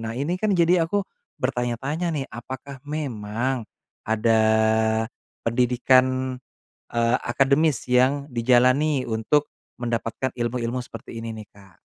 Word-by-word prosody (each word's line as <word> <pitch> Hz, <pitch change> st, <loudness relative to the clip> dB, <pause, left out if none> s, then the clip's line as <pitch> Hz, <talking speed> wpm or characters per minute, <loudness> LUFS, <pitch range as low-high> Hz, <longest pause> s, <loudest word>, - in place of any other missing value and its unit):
Nah 115 Hz, +1 st, -5 dB
ini 165 Hz, +8 st, -2 dB
kan 210 Hz, -3 st, +2 dB
jadi 170 Hz, -1 st, +3 dB
aku 200 Hz, +2 st, 0 dB, 0.3 s
bertanya-tanya 130 Hz, +8 st, -2 dB
nih 150 Hz, -5 st, -2 dB
apakah 130 Hz, +4 st, -8 dB
memang 120 Hz, -4 st, -3 dB, 0.4 s
ada, 110 Hz, 0 st, +3 dB, 1.0 s
pendidikan, 130 Hz, +2 st, +2 dB, 0.5 s
eee, 120 Hz, +1 st, +2 dB
akademis 140 Hz, +3 st, +2 dB
yang 130 Hz, +3 st, +3 dB
dijalani 130 Hz, +3 st, +3 dB
untuk 120 Hz, +7 st, +1 dB, 0.3 s
mendapatkan 120 Hz, +1 st, -2 dB
ilmu-ilmu 120 Hz, +1 st, -2 dB
seperti 120 Hz, -, -10 dB
ini 115 Hz, -, -4 dB
nih, 110 Hz, -1 st, -9 dB
Kak? 95 Hz, -3 st, -19 dB
125 Hz, 110 wpm, -24 LUFS, 115-140 Hz, 1.0 s, jadi